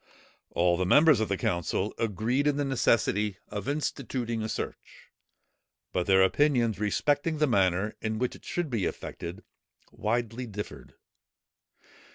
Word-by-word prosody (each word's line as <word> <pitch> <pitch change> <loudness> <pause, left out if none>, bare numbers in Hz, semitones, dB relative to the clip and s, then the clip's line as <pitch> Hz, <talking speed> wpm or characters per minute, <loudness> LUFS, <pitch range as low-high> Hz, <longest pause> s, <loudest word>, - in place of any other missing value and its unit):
All 85 0 +2
the 90 - 0
members 150 - +6
of 110 - -1
the 100 - 0
council 90 +4 -1
agreed 115 +6 0
in 145 -1 +2
the 145 - 0
necessity 105 -6 +1
of 100 -1 -5
instituting 130 -5 -2
a 110 - -3
search: - - -7 0.8
but 90 - 0
their 95 -1 +6
opinions 120 -1 +2
respecting 145 +9 +1
the 150 - +3
manner 95 -4 +1
in 110 0 -2
which 125 +2 -1
it - - -15
should 175 -5 -3
be 110 -6 0
effected, 85 +3 -6 0.5
widely 120 +2 -2
differed. 100 - -8
110 Hz, 140 wpm, -28 LUFS, 95-135 Hz, 0.8 s, members